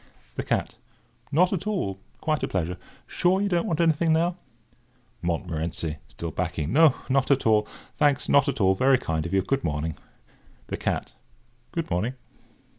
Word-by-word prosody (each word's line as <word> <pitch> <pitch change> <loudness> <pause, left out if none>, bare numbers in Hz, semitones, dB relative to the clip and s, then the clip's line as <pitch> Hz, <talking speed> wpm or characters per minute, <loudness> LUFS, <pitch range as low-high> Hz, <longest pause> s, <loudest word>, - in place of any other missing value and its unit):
THE - - -3
CAT: - - -1 0.5
"Not 180 +5 +4
at 190 +2 -3
all—quite 155 - -2
a - - 0
pleasure. 90 -1 -2 0.3
Sure 180 +2 +2
you 200 - +1
don't 175 -3 +1
want 160 - -1
anything, 165 0 +3
now?" 170 +2 +2 0.9
MONTMORENCY 85 -2 -2
(still 85 -1 -6
backing): 80 -4 -2
"Not 135 -3 +3
at 140 -1 +3
all, 105 -1 +4 0.3
thanks—not 140 -1 +3
at - - -1
all—very 105 +8 +4
kind 80 -9 -2
of - - -8
you. 95 - +3
Good 135 +7 -1
morning." 75 0 -2 0.7
THE - - -2
CAT: - - -2 0.6
"Good 165 - -3
morning." 110 +9 0
125 Hz, 145 wpm, -26 LUFS, -, 0.9 s, Not